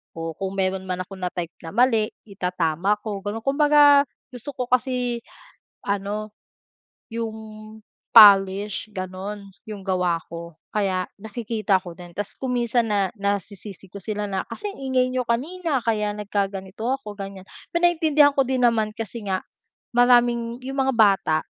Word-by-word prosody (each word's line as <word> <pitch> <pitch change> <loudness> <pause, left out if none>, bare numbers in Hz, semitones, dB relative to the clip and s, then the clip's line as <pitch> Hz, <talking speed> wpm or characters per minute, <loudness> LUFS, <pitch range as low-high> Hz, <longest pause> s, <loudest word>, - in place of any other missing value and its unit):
o 165 0 -4
kung 190 +4 -5
meron 190 0 -1
man 185 0 -2
akong 190 +1 -11
na 180 - -1
type 175 -2 -4
na 165 +3 -9
mali 230 -3 +4 0.2
itatama 180 -2 0
ko, 210 -3 -4
gano'n. 205 +3 -5
Kumbaga 290 0 +5 0.2
gusto 250 +3 -8
ko 250 - -2
kasi 250 -1 0 0.6
ano, 205 +2 -3 0.8
'yong 225 -1 -3 0.8
polish 205 0 +6
gano'n 195 +2 -6 0.2
'yong 210 -2 -7
gawa 180 -3 0
ko. 170 0 -8 0.2
Kaya, 190 -3 -1
nakikita 215 -2 -1
ko 175 -2 -10
din, 175 -1 -11
tapos 205 +3 -5
kung 260 -2 -2
minsan 240 -1 +1
na, 200 -2 +2
na 200 0 0
nasisisi 195 0 -11
ko 200 - -9
sila 205 +1 -4
na, 190 -1 -2
"Kasi 410 - -5
ang 400 - -10
ingay 260 -2 +1
n'yo 255 -1 -1
kanina, 290 +4 -1
kaya 210 -2 0
nagkaganito 200 0 -3
ako", 215 -7 -6
ganyan. 195 -1 -7 0.3
Pero 345 +1 +4
naiintindihan 305 -4 +3
ko 270 - +4
din 260 0 0
naman 225 -3 +2
kasi 225 0 -6
nga 190 -1 -1 0.6
,maraming 240 -1 +3
'yong 270 +2 -6
mga 265 0 +2
bata 200 -8 +4
210 Hz, 155 wpm, -23 LUFS, 195-245 Hz, 0.8 s, polish